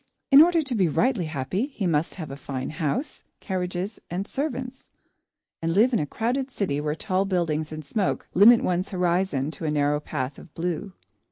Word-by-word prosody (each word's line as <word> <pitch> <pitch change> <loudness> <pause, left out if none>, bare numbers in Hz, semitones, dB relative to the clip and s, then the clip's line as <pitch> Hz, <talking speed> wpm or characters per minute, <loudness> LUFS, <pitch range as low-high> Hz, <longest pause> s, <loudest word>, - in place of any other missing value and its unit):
In 275 +2 +10
order 335 0 +5
to 270 -3 -2
be 195 -6 +3
rightly 225 - +1
happy, 155 - -2
he 245 -9 -4
must 160 -2 0
have 160 -6 -7
a - - -5
fine 135 -2 -5
house, 155 - -3 0.2
carriages, 185 +1 -3
and 180 +3 -3
servants, 265 -3 -4 0.7
and 165 0 0
live 235 +5 +4
in 230 - +3
a 150 - -1
crowded 250 - -1
city 165 - -2
where 150 0 -1
tall 185 +2 0
buildings 165 -5 -1
and 155 -1 -7
smoke 205 +2 -1
limit 225 +6 +7
one's 180 +1 0
horizon 175 -6 0
to 160 +1 -7
a - - +1
narrow 145 0 +1
patch 135 -2 -4
of 165 - -14
blue. 175 +3 -3
180 Hz, 185 wpm, -25 LUFS, 155-220 Hz, 0.7 s, In